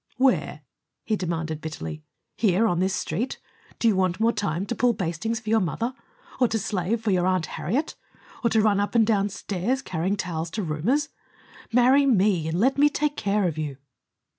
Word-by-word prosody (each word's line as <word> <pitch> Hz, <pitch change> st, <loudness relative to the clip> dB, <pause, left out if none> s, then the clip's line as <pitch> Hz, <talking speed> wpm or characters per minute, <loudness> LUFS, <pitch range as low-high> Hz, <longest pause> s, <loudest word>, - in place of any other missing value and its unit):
"Where?" 260 Hz, 0 st, +1 dB, 0.4 s
he 220 Hz, -, 0 dB
demanded 165 Hz, -4 st, -3 dB
bitterly. 80 Hz, -, -6 dB, 0.3 s
"Here 210 Hz, 0 st, +2 dB
on 175 Hz, -6 st, +1 dB
this 190 Hz, +1 st, +1 dB
Street? 210 Hz, +13 st, -2 dB, 0.4 s
Do 230 Hz, -, +1 dB
you 215 Hz, -, +4 dB
want 185 Hz, 0 st, +1 dB
more 225 Hz, +1 st, +3 dB
time 195 Hz, -4 st, -2 dB
to 240 Hz, -, -3 dB
pull 240 Hz, -1 st, +2 dB
bastings 190 Hz, +5 st, -2 dB
for 220 Hz, -1 st, -5 dB
your 225 Hz, -, +5 dB
mother? 225 Hz, -, -2 dB, 0.5 s
Or 250 Hz, -, +5 dB
to 225 Hz, -, -1 dB
slave 210 Hz, +1 st, -1 dB
for 220 Hz, -2 st, 0 dB
your 180 Hz, -1 st, +2 dB
Aunt 185 Hz, -3 st, +1 dB
Harriet? 255 Hz, -, -2 dB, 0.5 s
Or 235 Hz, -, +3 dB
to 220 Hz, -1 st, +3 dB
run 205 Hz, -2 st, +3 dB
up 205 Hz, +3 st, -1 dB
and 225 Hz, -2 st, +5 dB
down 205 Hz, -2 st, +2 dB
stairs, 205 Hz, +7 st, -2 dB
carrying 185 Hz, +4 st, -1 dB
towels 170 Hz, -3 st, -3 dB
to 210 Hz, -, -1 dB
roomers? 205 Hz, -, 0 dB, 0.6 s
Marry 255 Hz, +4 st, +5 dB
me 195 Hz, -, +3 dB
and 165 Hz, +2 st, -1 dB
let 265 Hz, +6 st, +2 dB
me 295 Hz, +1 st, +6 dB
take 295 Hz, 0 st, -1 dB
care 200 Hz, -5 st, +1 dB
of 155 Hz, -2 st, -3 dB
you." 145 Hz, -4 st, -4 dB
205 Hz, 190 wpm, -25 LUFS, 175-230 Hz, 0.6 s, me